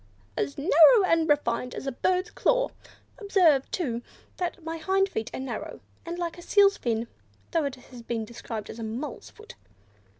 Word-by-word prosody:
as 140 0 -2
narrow 335 - +7
and 330 -2 +2
refined 250 -4 +1
as - - -6
a 270 - -1
bird's 365 +8 0
claw. - - +2 0.5
Observe, 360 - +3
too, 245 -10 -2 0.4
that 355 -1 -3
my 325 +1 -4
hind 385 +4 +2
feet 225 - -4
are - - -5
narrow, 265 0 -5 0.3
and 340 +1 -4
like 345 0 -4
a - - -9
seal's 400 +2 +4
fin, 230 - -2 0.4
though 330 -4 +1
it 275 -2 -3
has 250 -1 -13
been 230 -1 -3
described 225 -1 -7
as 230 - -10
a - - -4
mole's 230 +7 -5
foot." 435 +2 -14
315 Hz, 175 wpm, -27 LUFS, 240-370 Hz, 0.5 s, narrow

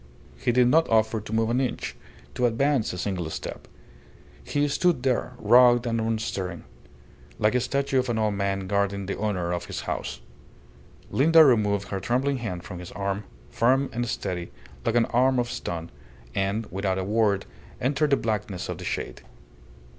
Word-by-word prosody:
He 120 - 0
did 125 0 +4
not 160 +5 +4
offer 110 0 +2
to 105 - -9
move 110 +1 +1
an 125 +2 +2
inch, 130 - -3 0.4
to 125 - +2
advance 130 +1 +1
a 90 - -6
single 90 -3 -2
step. - - -6 0.8
He 145 0 0
stood 150 -2 +1
there, 125 -1 0
rugged 120 0 +6
and 115 -1 0
unstirring, 110 -6 -2 0.7
like 105 +2 +2
a 125 - +3
statue 140 +1 0
of 130 0 -1
an 115 - 0
old 110 -1 +1
man 100 -1 -1
guarding 100 0 0
the 100 - -3
honour 90 -5 -1
of 85 0 -3
his - - -5
house. - - -4 0.9
Linda 160 +3 +6
removed 105 -6 +2
her 100 - -2
trembling 130 +7 0
hand 90 -8 -5
from 90 -1 -8
his 90 - -9
arm, 100 +1 -3 0.3
firm 130 - +2
and 120 0 -2
steady 90 -3 -3 0.3
like 115 - 0
an 120 -1 +4
arm 130 +2 +2
of 120 -1 0
stone, 85 -1 -5 0.4
and, 100 - -1
without 95 0 -1
a 95 - -1
word, 105 -1 +1 0.3
entered 145 +4 +1
the 140 - +4
blackness 105 -4 -3
of - - -4
the - - -7
shade. - - -4
110 Hz, 175 wpm, -26 LUFS, 100-125 Hz, 0.9 s, rugged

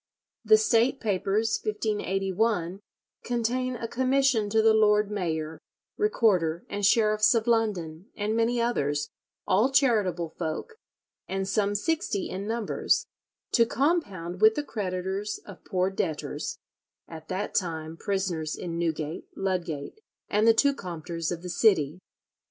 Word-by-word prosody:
The 435 - +6
State 265 - +2
Papers, 210 +1 0
1581, 200 -3 -1 0.4
contain 245 +2 -1
a 230 -1 -4
commission 255 -3 +2
to 220 +2 +2
the 220 0 +5
lord 210 -1 +3
mayor, 160 -5 -3 0.4
recorder, 190 - +1
and 205 0 -4
sheriffs 215 +1 +4
of 225 -1 +1
London, 200 -7 0
and 210 +1 -1
many 230 +1 +1
others, 145 -12 0 0.4
all 215 +8 +3
charitable 205 - +2
folk, 160 - -3 0.5
and 190 0 -2
some 205 0 +1
sixty 230 - -1
in 195 +2 -4
numbers, 225 -1 0 0.5
to 235 - +5
compound 200 - -1
with 220 0 +6
the 295 - -1
creditors 195 -3 -3
of 200 -3 -12
poor 185 0 0
debtors, 160 -5 -3 0.5
at 160 -1 -10
that 190 +2 -3
time 160 -3 -2
prisoners 180 -5 -2
in 170 -1 -5
Newgate, 160 -2 -3
Ludgate, 180 - -3 0.3
and 210 +2 +2
the 225 - +8
two 280 +4 +4
Compters 170 - -5
of 175 0 -5
the - - -5
city. 175 -5 +2
205 Hz, 130 wpm, -27 LUFS, 175-225 Hz, 0.5 s, the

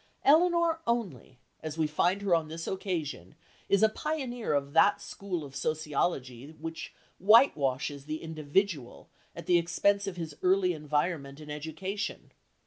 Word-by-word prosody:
Elinor 335 +2 +4
only, 200 - -2 0.2
as 155 0 -6
we 160 - +2
find 175 +6 +1
her 195 -3 +2
on 165 -2 +2
this 165 +1 -6
occasion, 175 -7 -4 0.3
is 200 +1 +4
a - - +8
pioneer 260 -3 -3
of 140 0 -1
that 200 +5 +5
school 195 -4 -5
of 135 -1 -10
sociology 150 -3 -2
which 165 +1 -6 0.3
whitewashes 145 - +3
the 155 +1 -5
individual 155 -2 -2 0.3
at - - -8
the 175 -1 +4
expense 200 +4 +1
of 185 -2 -5
his 160 -3 -5
early 185 0 +3
environment 150 -2 -2
and 150 -1 -9
education. 160 +7 -5
165 Hz, 140 wpm, -29 LUFS, 150-200 Hz, 0.3 s, a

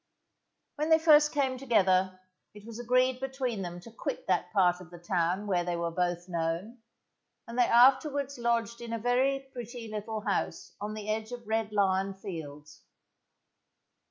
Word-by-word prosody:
When 305 +2 -1
they 320 - +7
first 305 -2 +6
came 265 -3 0
together 190 -7 +2 0.4
it 210 0 -13
was 230 0 -8
agreed 255 +1 +2
between 260 -5 -3
them 175 -1 -6
to 230 - -12
quit 225 - -5
that 180 -1 0
part 180 -3 +3
of 175 - -12
the 175 - -11
town 175 +2 -1
where 180 -4 +1
they 175 0 -2
were 170 0 -2
both 175 0 -1
known, 170 +7 -3 0.7
and 230 - -7
they 245 -1 +4
afterwards 275 +3 +4
lodged 235 -1 0
in 235 -1 -6
a - - 0
very 265 +4 0
pretty 240 -1 -7
little 215 +1 -4
house 205 -1 -2
on 210 +1 -4
the 215 -1 -7
edge 220 +1 -2
of 240 -2 -8
Red 220 -1 -1
Lion 195 -1 +1
Fields. 150 -6 -9
215 Hz, 165 wpm, -29 LUFS, 185-245 Hz, 0.7 s, they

